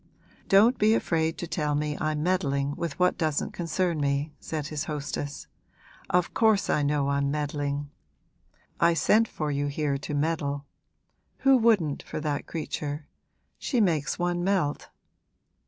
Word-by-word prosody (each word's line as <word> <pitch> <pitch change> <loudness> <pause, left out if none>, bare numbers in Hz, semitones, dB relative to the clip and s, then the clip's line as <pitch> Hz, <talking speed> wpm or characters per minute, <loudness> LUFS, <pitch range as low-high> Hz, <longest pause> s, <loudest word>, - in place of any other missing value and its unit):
'Don't 220 +6 +5
be 215 +2 +5
afraid 160 -5 0
to - - -4
tell 150 -3 -1
me 150 0 -1
I'm 155 -1 0
meddling 145 -6 0
with 170 - -4
what 180 0 +2
doesn't 155 -3 0
concern 170 -1 -1
me,' 140 +2 0
said 155 -3 -4
his 150 -2 -3
hostess. 145 -1 -4 0.6
'Of 180 -1 +1
course 220 -3 +3
I 150 - +2
know 145 -1 +1
I'm 140 0 +1
meddling; 145 -1 -2 0.9
I 170 0 +4
sent 220 +8 +4
for 150 -6 -3
you 145 0 -1
here 145 -1 -1
to 145 +1 -4
meddle. 145 -2 -1 0.8
Who 270 0 +6
wouldn't, 215 - +3
for - - -6
that 150 -2 -2
creature? 150 -2 -4 0.5
She 250 - 0
makes 160 -9 +1
one 175 0 0
melt.' 180 -6 0
155 Hz, 145 wpm, -27 LUFS, 145-175 Hz, 0.9 s, Who